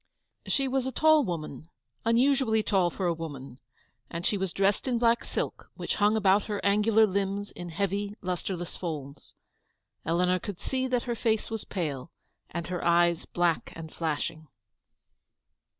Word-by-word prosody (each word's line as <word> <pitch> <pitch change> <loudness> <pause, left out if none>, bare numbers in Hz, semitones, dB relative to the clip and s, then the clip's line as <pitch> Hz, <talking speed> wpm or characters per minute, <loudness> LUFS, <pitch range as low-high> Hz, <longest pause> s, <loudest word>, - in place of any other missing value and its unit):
She 275 -1 +1
was 265 0 0
a - - -2
tall 310 +2 +5
woman, 160 - -5 0.4
unusually 235 -1 +3
tall 190 -5 +2
for 185 +2 -4
a 175 - +2
woman, 140 -6 -7 0.5
and 170 +2 -5
she 210 - +2
was 190 -2 -1
dressed 195 +7 +1
in 245 -2 +1
black 235 0 +3
silk, - - -4
which - - -3
hung 210 +2 +4
about 200 -1 +4
her 205 -2 -2
angular 210 +2 +5
limbs 200 0 -2
in 175 -1 -7
heavy, 200 +4 -2
lustreless 180 -1 -4
folds. 150 -5 -6 0.7
Eleanor 180 +3 +2
could 200 -1 -6
see 260 -1 -1
that 250 -2 0
her 240 - -2
face 225 -1 0
was 225 -2 -3
pale, 145 -9 -3 0.4
and 170 -1 -4
her 180 -1 -4
eyes 170 0 +3
black 175 -2 0
and 160 -1 -8
flashing. 155 0 -3
195 Hz, 155 wpm, -28 LUFS, 170-220 Hz, 0.7 s, tall